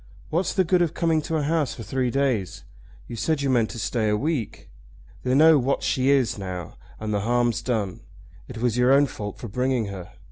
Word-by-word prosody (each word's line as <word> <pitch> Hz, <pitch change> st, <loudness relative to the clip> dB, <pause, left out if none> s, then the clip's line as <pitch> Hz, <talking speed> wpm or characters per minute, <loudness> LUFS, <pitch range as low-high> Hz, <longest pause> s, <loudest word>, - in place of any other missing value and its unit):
"What's 170 Hz, +3 st, 0 dB
the 190 Hz, -, +4 dB
good 180 Hz, +1 st, +2 dB
of 165 Hz, -2 st, 0 dB
coming 165 Hz, -2 st, +1 dB
to 160 Hz, -, -3 dB
a 150 Hz, -, -1 dB
house 155 Hz, -1 st, 0 dB
for 115 Hz, -, -8 dB
three 125 Hz, +4 st, -1 dB
days? 125 Hz, -8 st, -1 dB, 0.4 s
You 120 Hz, -, -7 dB
said 145 Hz, +4 st, -1 dB
you 135 Hz, -, +1 dB
meant 115 Hz, -4 st, +2 dB
to -, -, -8 dB
stay 110 Hz, -1 st, -1 dB
a 105 Hz, -, +2 dB
week. 145 Hz, -3 st, -3 dB, 0.5 s
They 130 Hz, 0 st, 0 dB
know 155 Hz, +1 st, +7 dB
what 135 Hz, +2 st, 0 dB
she 130 Hz, +1 st, +1 dB
is 135 Hz, -6 st, +2 dB
now, 90 Hz, -4 st, -6 dB, 0.2 s
and 110 Hz, 0 st, -3 dB
the 105 Hz, -, +1 dB
harm's 120 Hz, +1 st, +1 dB
done. 110 Hz, -7 st, -2 dB, 0.5 s
It 125 Hz, -, -9 dB
was 120 Hz, 0 st, 0 dB
your 125 Hz, +1 st, +4 dB
own 140 Hz, +1 st, +6 dB
fault 105 Hz, -6 st, -6 dB
for 120 Hz, -, -7 dB
bringing 125 Hz, 0 st, -1 dB
her. 95 Hz, -3 st, -8 dB
125 Hz, 215 wpm, -24 LUFS, 110-145 Hz, 0.5 s, know